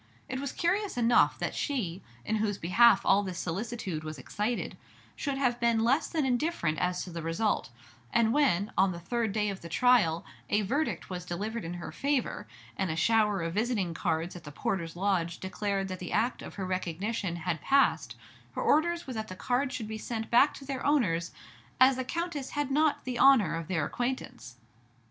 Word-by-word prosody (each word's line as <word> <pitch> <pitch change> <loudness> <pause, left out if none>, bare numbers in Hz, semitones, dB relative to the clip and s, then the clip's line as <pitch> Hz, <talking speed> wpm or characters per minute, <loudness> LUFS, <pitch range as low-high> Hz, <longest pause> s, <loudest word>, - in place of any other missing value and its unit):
It 260 - -4
was 280 -1 -3
curious 380 0 0
enough 240 0 +4
that - - -2
she, 200 - -2 0.2
in 220 - 0
whose 210 -2 0
behalf 205 +4 +5
all 195 +1 +5
this 185 -3 -5
solicitude 185 -2 -3
was 155 -1 -6
excited, 210 - -3 0.4
should 280 -2 -2
have 250 -3 +1
been 235 -2 +2
less 270 +7 +2
than 315 -4 -1
indifferent 245 - 0
as 180 0 0
to 180 - -8
the 170 0 -5
result; 165 +2 0 0.4
and 230 -1 +3
when, 220 -9 +2
on 190 -1 +3
the 170 - -7
third 230 +4 -1
day 210 0 0
of 195 -1 -5
the 170 - -8
trial, 210 -6 +3 0.2
a 210 +1 +2
verdict 280 +2 -2
was 180 -1 -4
delivered 210 +6 -4
in 170 +2 -5
her 175 - -6
favor, 280 -2 -1 0.3
and 190 -2 -1
a 160 - -1
shower 210 0 +2
of 165 0 -3
visiting 210 -5 0
cards 165 0 -1
at 175 - -9
the 145 - -9
porter's 165 +2 -3
lodge 175 -3 0
declared 195 +1 -2
that 185 -1 -5
the 180 - -6
act 240 +3 0
of - - -9
her 195 - -3
recognition 185 +1 -2
had 170 -2 -3
passed, 160 - +2 0.4
her - - -3
orders 340 +3 +2
were 260 - -5
that 220 -1 -4
the 185 - -7
cards 255 +7 -1
should 220 -4 -4
be 220 0 -5
sent 225 0 -4
back 275 +5 +6
to 275 - -10
their 270 -1 -4
owners, 185 - +1 0.5
as 260 +1 +7
the 260 - -1
Countess 320 -1 -3
had 290 -2 0
not 300 +1 +2
the 250 -2 -3
honor 270 -9 +6
of 165 -1 -5
their 165 -5 0
acquaintance. 245 - -4
215 Hz, 195 wpm, -29 LUFS, 175-255 Hz, 0.5 s, as